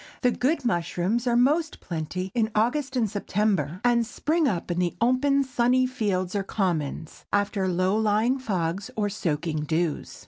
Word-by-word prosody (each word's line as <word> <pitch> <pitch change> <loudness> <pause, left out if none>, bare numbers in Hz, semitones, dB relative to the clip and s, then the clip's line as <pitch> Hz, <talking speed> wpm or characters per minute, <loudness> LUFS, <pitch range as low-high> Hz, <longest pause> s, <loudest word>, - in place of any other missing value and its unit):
The 250 - +4
good 275 +3 0
mushrooms 190 +3 0
are 240 - +3
most 300 +6 +2
plenty 180 +3 -4
in 225 -3 +1
August 260 +5 +1
and 235 -3 +2
September, 195 -5 -1
and 240 -1 +3
spring 305 +7 0
up 180 -6 -2
in 175 - -1
the 175 -1 0
open, 275 +3 +3
sunny 255 0 +2
fields 195 -8 -1
or 200 - +1
commons, 165 -6 -2
after 200 -1 +1
low 185 +2 +1
lying 220 +4 +2
fogs 190 -3 -2
or 210 -2 0
soaking 155 -5 -2
dews. 160 0 -2
210 Hz, 160 wpm, -26 LUFS, 180-250 Hz, -, The